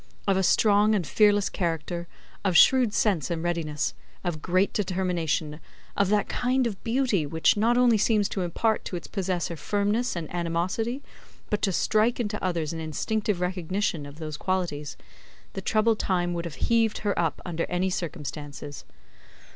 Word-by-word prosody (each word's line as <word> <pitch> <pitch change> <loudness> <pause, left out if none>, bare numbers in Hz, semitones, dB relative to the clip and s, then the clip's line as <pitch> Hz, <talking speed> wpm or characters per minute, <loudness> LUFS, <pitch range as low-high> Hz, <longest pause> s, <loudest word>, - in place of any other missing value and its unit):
Of 195 - +4
a 190 - +2
strong 210 +2 +4
and 185 -5 0
fearless 205 +7 +3
character, 170 -1 -3 0.4
of 185 -4 +3
shrewd 255 0 +6
sense 200 -8 +1
and 170 -1 -2
readiness, 165 -4 -1 0.3
of 160 -3 -3
great 185 +3 +1
determination, 175 -6 -1 0.4
of 200 -1 +2
that 210 0 +2
kind 255 +1 +1
of 205 -5 -4
beauty 230 - +1
which 160 +2 +3
not 230 +3 +2
only 240 -3 +4
seems 210 -1 +3
to 195 - -2
impart 215 +6 0
to - - -4
its 170 - -5
possessor 180 -4 -2
firmness 205 - 0
and 165 -2 -4
animosity, 180 +9 -1 0.5
but 210 - 0
to 195 - +2
strike 215 +6 +2
into 210 -2 -2
others 170 -4 -1
an 165 - -5
instinctive 190 +5 -1
recognition 180 -3 -1
of 145 +1 -12
those 155 -2 -5
qualities; 150 -7 -2 0.6
the 195 - -4
troubled 215 +2 +2
time 175 -2 0
would 170 0 -3
have 165 - -6
heaved 225 -2 +2
her 205 - +2
up, 165 -3 0
under 170 -2 -2
any 185 +1 0
circumstances. 145 -4 -6
185 Hz, 165 wpm, -26 LUFS, 165-210 Hz, 0.6 s, shrewd